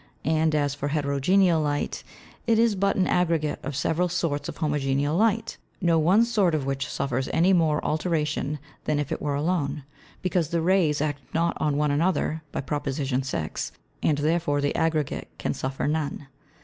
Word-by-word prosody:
And 160 +1 +2
as 145 -2 +1
for 145 0 -3
Heterogeneal 155 +5 +2
Light, 145 -1 -2 0.4
it 225 -1 +4
is 230 -1 +4
but 195 0 +1
an 185 - +2
Aggregate 165 -5 +1
of 140 0 -5
several 165 +5 +1
sorts 155 -5 -1
of - - -7
Homogeneal 145 -1 0
Light, 225 +3 +1 0.2
no 170 -3 +3
one 190 +9 +4
sort 205 -8 +2
of 145 -3 -1
which 135 0 -2
suffers 130 -1 -2
any 180 +4 +4
more 160 -4 +2
alteration 150 -2 -1 0.3
than 150 - +1
if 145 -2 -2
it - - -2
were 145 -1 -1
alone; 150 -2 -1 0.4
because 180 -4 0
the 170 -1 0
Rays 165 -4 +2
act 145 -2 -1
not 170 +1 +1
on 150 -2 +1
one 150 0 +2
another, 160 +1 +1
by - - -2
Prop. 145 +1 -3
6. 135 - -2 0.3
and 150 - +2
therefore 150 -1 +1
the 145 0 0
Aggregate 160 -3 0
can - - -2
suffer 135 +1 -3
none. 150 -1 -2
155 Hz, 175 wpm, -26 LUFS, 145-170 Hz, 0.4 s, it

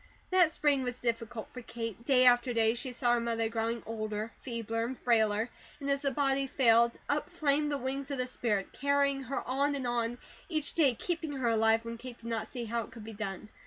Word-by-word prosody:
That 365 -3 +6
spring 295 -3 +2
was 250 -1 -3
difficult 230 -1 -3
for 250 - -8
Kate. 230 -2 -6
Day 255 -2 +5
after 245 0 +5
day 225 -1 +4
she 250 +2 -4
saw 245 -1 +1
her 240 - +3
mother 230 -1 0
growing 230 0 -2
older, 215 0 -3
feebler, 230 -2 -3
and 250 +2 -4
frailer. 220 -1 +2 0.3
And 280 -1 -1
as 280 0 +1
the 280 - +1
body 275 0 +1
failed, 235 -3 +4
up 295 +3 0
flamed 300 -4 +1
the 285 - 0
wings 270 +2 -3
of 280 - -2
the 255 - 0
spirit, 220 -6 -1
carrying 280 0 +2
her 270 +1 -3
on 280 +3 +1
and 270 -2 -3
on, 240 0 -1 0.3
each 310 -4 -1
day 280 -7 +3
keeping 325 +1 -2
her 260 -4 0
alive, 225 0 +3
when 230 0 -6
Kate 250 -1 -8
did 230 - -17
not 230 -2 -2
see 245 -3 -5
how 230 +1 -1
it 225 - -9
could 225 -2 -10
be 225 +1 -8
done. 205 -1 -5
240 Hz, 220 wpm, -31 LUFS, 230-275 Hz, 0.3 s, That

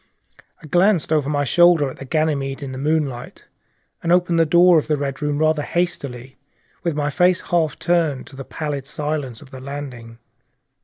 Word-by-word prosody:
I - - -9
glanced 175 +1 +2
over 145 -3 +1
my 145 -1 0
shoulder 175 +1 +4
at 130 - -8
the 135 - -8
black - - -19
Ganymede 145 -3 -1
in 135 - -5
the 130 - -6
moonlight, 145 -4 -2 0.6
and 170 - -1
opened 175 -1 +3
the 165 - +4
door 175 +1 +6
of - - -6
the 150 -1 +1
Red 140 0 -4
Room 150 -1 -1
rather 155 0 +2
hastily, 140 -7 -3 0.4
with 170 -3 -2
my 150 0 -1
face 180 +4 +3
half 165 -3 +1
turned 165 -6 0
to 135 - -14
the 135 - -7
pallid 145 -2 -5
silence 150 -4 -4
of 135 - -18
the 130 - -9
corridor. 130 -4 -8
150 Hz, 190 wpm, -21 LUFS, 135-165 Hz, 0.6 s, door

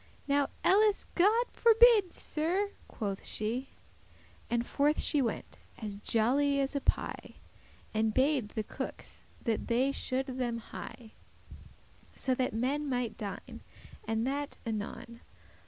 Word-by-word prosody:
"Now 280 -1 +3 0.2
elles 415 +2 +4
God 430 +7 +4
forbidde, 455 -4 +6
Sir," 365 +6 -1 0.2
quoth 200 -3 -4
she; 235 +5 -2 0.8
And 235 0 0
forth 290 +4 +2
she 290 - +3
went, 235 - -3 0.2
as 205 -3 -5
jolly 275 +7 +2
as 275 +1 -1
a 280 - 0
pie, - - -2 0.6
And 220 0 +2
bade 260 -2 +2
the 220 - -3
cookes - - -7 0.2
that 225 -2 -1
they 255 +4 +2
should 265 -1 -1
them 250 -3 -2
hie,* 230 - -8
*make - - -10 1.1
haste - - -14
So 260 - +2
that 255 0 0
men 275 +6 -1
mighte 245 -4 -1
dine, 200 -2 -7 0.5
and 225 +1 0
that 285 +2 -2
anon. 230 +1 -5
260 Hz, 135 wpm, -31 LUFS, 230-295 Hz, 1.1 s, forbidde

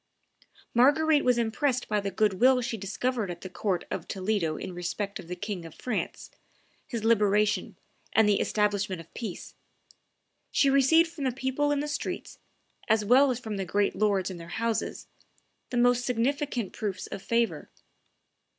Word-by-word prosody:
Marguerite 290 +5 +4
was 250 -1 +3
impressed 245 +3 0
by 210 -1 +1
the 200 -1 -2
good 205 -2 +1
will 255 0 +6
she 235 -1 -2
discovered 220 +2 -2
at 175 -1 -6
the 185 - -8
court 185 -2 -1
of - - -4
Toledo 185 -5 -1
in 185 - -6
respect 185 +3 -4
of - - -10
the 180 - -4
King 200 -1 -5
of 165 -2 -11
France, 245 -5 -4 0.6
his 230 -3 -4
liberation, 210 -2 +2 0.3
and 220 -1 +4
the 205 -1 +3
establishment 205 -3 0
of 165 - -13
peace; 220 -7 -6 1.0
she 275 - +3
received 275 +5 +5
from 295 -5 -5
the 260 - +2
people 265 +3 -1
in 285 -1 +1
the 295 - -3
streets, 295 - -4 0.5
as 220 -1 +2
well 260 +6 +6
as 250 - 0
from 220 -4 -5
the 195 - -1
great 200 +2 0
lords 200 -3 +1
in 180 - -7
their 170 0 -10
houses, 225 +5 -2 0.6
the 245 - -2
most 245 0 +4
significant 250 -2 -1
proofs 205 -3 -4
of 195 - -7
favor. 230 -6 0
220 Hz, 170 wpm, -28 LUFS, 195-250 Hz, 1.0 s, will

